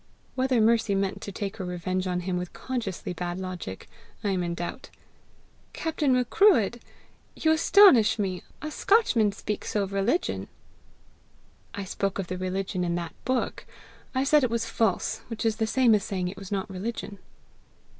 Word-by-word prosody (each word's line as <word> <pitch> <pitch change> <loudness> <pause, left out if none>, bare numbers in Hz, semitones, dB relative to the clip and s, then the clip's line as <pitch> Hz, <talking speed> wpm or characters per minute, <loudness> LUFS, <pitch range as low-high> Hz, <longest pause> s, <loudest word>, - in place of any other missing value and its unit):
Whether 255 -2 +1
Mercy 220 -2 +3
meant 195 0 -1
to 200 - -6
take 200 +2 -4
her 195 - -4
revenge 185 +1 -2
on 180 0 -1
him 180 0 -2
with 180 0 -4
consciously 225 -9 -4
bad 175 +1 -4
logic, 180 - -6 0.4
I 205 - 0
am 185 -2 0
in 170 -1 -2
doubt. 175 +10 -6 0.8
"Captain 310 -4 0
Macruadh! 250 - +4 0.6
you 315 - +2
astonish 315 - +6
me! 190 -4 -2 0.2
A 305 - -4
Scotchman 280 - +3
speak 205 +1 -4
so 210 - -1
of 195 0 -5
religion!" 200 - 0 1.3
"I 200 - -4
spoke 195 +1 -2
of 195 - -2
the 185 - -3
religion 185 0 -2
in 170 -1 0
that 170 -2 -4
book. 255 -1 -1 0.5
I 260 - +2
said 295 +1 +4
it 255 - +2
was 230 0 -1
false 225 -4 0
which 230 -1 -5
is 220 -1 +1
the 220 -1 0
same 240 0 +4
as 205 -2 +3
saying 185 -4 -2
it 185 - -8
was 195 -1 -10
not 195 -2 -1
religion." 200 +1 -5
200 Hz, 170 wpm, -27 LUFS, 185-235 Hz, 1.3 s, astonish